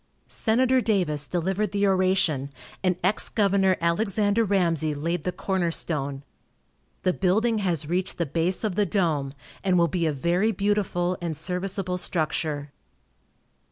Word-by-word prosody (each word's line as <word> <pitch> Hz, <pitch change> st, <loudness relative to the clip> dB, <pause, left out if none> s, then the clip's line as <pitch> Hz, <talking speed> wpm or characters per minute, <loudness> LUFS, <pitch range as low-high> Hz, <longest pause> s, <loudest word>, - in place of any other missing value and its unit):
Senator 255 Hz, +3 st, +2 dB
Davis 175 Hz, -10 st, 0 dB
delivered 190 Hz, +4 st, -1 dB
the 205 Hz, 0 st, +1 dB
oration, 185 Hz, -7 st, +1 dB, 0.3 s
and 185 Hz, -1 st, +2 dB
ex 195 Hz, +4 st, +2 dB
Gov. 195 Hz, -3 st, +2 dB
Alexander 205 Hz, +5 st, +1 dB
Ramsey 170 Hz, -7 st, +1 dB
laid 165 Hz, +2 st, -3 dB
the 180 Hz, -, 0 dB
corner 180 Hz, -1 st, -1 dB
stone. 140 Hz, -4 st, -1 dB, 0.8 s
The 185 Hz, -, +2 dB
building 215 Hz, +5 st, +1 dB
has 170 Hz, -7 st, -1 dB
reached 180 Hz, +3 st, -1 dB
the 170 Hz, -, 0 dB
base 165 Hz, +6 st, 0 dB
of 215 Hz, -3 st, 0 dB
the 205 Hz, +1 st, +1 dB
dome, 155 Hz, -8 st, 0 dB, 0.3 s
and 185 Hz, -2 st, +2 dB
will 170 Hz, -1 st, +4 dB
be 170 Hz, 0 st, -1 dB
a -, -, +1 dB
very 175 Hz, +9 st, +1 dB
beautiful 195 Hz, -3 st, 0 dB
and 165 Hz, -3 st, -3 dB
serviceable 180 Hz, +2 st, -2 dB
structure. 155 Hz, -4 st, -1 dB
180 Hz, 140 wpm, -25 LUFS, 165-200 Hz, 0.8 s, will